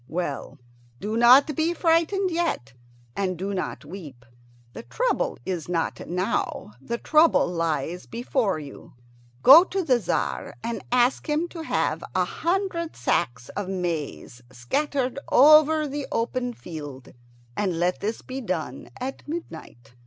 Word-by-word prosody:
Well, 165 -4 -4 0.4
do 215 +2 -3
not 255 +6 +6
be 330 +4 0
frightened 340 +3 +2
yet, 330 - -2 0.4
and 185 -3 -1
do 195 +3 -3
not 185 -5 -4
weep. 145 -8 -10 0.5
The - - -7
trouble - - -1
is 175 -3 -4
not 165 -2 -2
now; 180 - -2
the 235 - -3
trouble 310 +6 +4
lies 165 -1 -2
before 235 - -1
you. 145 -4 -11 0.5
Go 310 +6 +10
to 385 0 -2
the 255 -6 +3
Tzar - - -2
and 230 0 -4
ask 250 +4 +2
him 305 +3 +1
to 335 - -8
have 320 - -1
a - - +3
hundred 345 -2 -2
sacks 120 -1 -1
of 200 -2 -5
maize 165 -9 -4
scattered 260 - -1
over 305 +2 +6
the 285 0 -4
open 245 +1 -1
field, 145 -6 -9 0.4
and 185 -5 -1
let 180 +1 +1
this 215 +3 -3
be 260 +1 -6
done 165 - -4
at 265 +2 -5
midnight." 160 - -8
230 Hz, 140 wpm, -25 LUFS, -, 0.5 s, Go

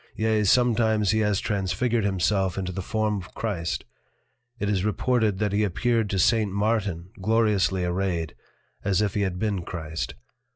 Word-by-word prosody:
Yea, 110 -1 +1
sometimes 110 -2 +3
he 110 - +2
has 105 -2 +2
transfigured 105 +3 0
himself 95 -1 +1
into 95 -1 -2
the 95 - -4
Form 105 +2 -1
of 90 -2 -9
Christ. 95 -7 -2 0.7
It 105 - -2
is 100 -3 +1
reported 110 -1 +1
that 105 0 0
he 105 +1 +2
appeared 110 +2 +1
to 95 - -1
St. 105 +2 +3
Martin 100 -4 -1
Gloriously 105 -4 +2
arrayed, 90 -3 -1 0.5
as 100 +1 +2
if 100 - -1
he 105 - 0
had 95 -2 -1
been 100 -2 -1
Christ. 80 -2 -5
100 Hz, 160 wpm, -25 LUFS, 95-110 Hz, 0.7 s, sometimes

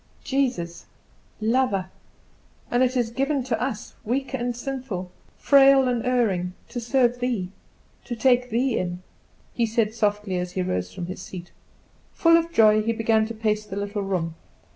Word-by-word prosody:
"Jesus, 250 -11 -2 0.5
lover, 215 -5 +1 0.8
and 245 - +2
is 255 0 +2
it 235 -1 -1
given 275 0 0
to 235 -3 -2
us, 250 -4 -3
weak 265 +5 -2
and 245 -2 -2
sinful, 240 -8 -5 0.3
frail 275 -1 +6
and 245 -2 0
erring, 210 -8 +1 0.2
to 245 - -4
serve 245 0 +2
Thee, 235 -8 -2 0.5
to 240 - -4
take 250 +1 +3
Thee 245 +2 +1
in!" 180 0 -4 0.5
he 235 -1 +1
said 220 -1 0
softly, 210 -4 0
as 180 0 -4
he 185 - -1
rose 90 - -2
from 175 - -6
his 185 +2 -7
seat. 175 -2 -9 0.6
Full 330 -1 +5
of 335 0 +2
joy, 215 -6 +5
he 230 +2 0
began 220 -1 +2
to 230 - -6
pace 215 -1 0
the 195 - -8
little 205 +1 -3
room. 180 -4 -2
225 Hz, 165 wpm, -24 LUFS, 195-255 Hz, 0.8 s, frail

